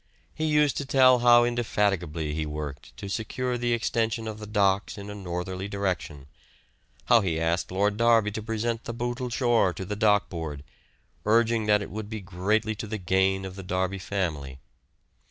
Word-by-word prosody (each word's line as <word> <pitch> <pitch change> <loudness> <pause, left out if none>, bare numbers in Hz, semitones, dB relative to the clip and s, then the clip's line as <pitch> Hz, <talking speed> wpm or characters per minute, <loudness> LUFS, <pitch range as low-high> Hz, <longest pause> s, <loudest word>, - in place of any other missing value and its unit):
He 155 - -2
used 150 -2 +3
to - - -1
tell 130 -2 +6
how 120 0 +6
indefatigably 100 -10 0
he 80 +1 -2
worked 75 -2 -7
to 100 - -7
secure 125 +5 -2
the 120 0 -1
extension 115 -1 -1
of 110 -1 -6
the 105 - -8
docks 100 -1 +1
in 100 0 -7
a - - -6
northerly 95 0 -4
direction, 90 -8 -3 0.8
how 120 -2 +5
he 85 -5 -1
asked 85 +1 0
Lord 100 +2 +1
Derby 115 -2 +4
to 110 - -4
present 115 +1 -2
the 115 - -5
Bootle 120 +1 -3
shore 120 -6 +2
to 95 - -6
the 105 - -4
Dock 105 -1 +3
Board, 80 -5 -6 0.6
urging 115 0 +2
that 105 -1 +4
it - - -9
would 105 0 -6
be 110 -1 -4
greatly 100 +4 0
to 110 - -5
the 110 - -3
gain 95 0 +1
of 95 -1 -7
the 95 - -7
Derby 95 +1 -2
family. 80 -9 -3
105 Hz, 180 wpm, -26 LUFS, 95-115 Hz, 0.8 s, tell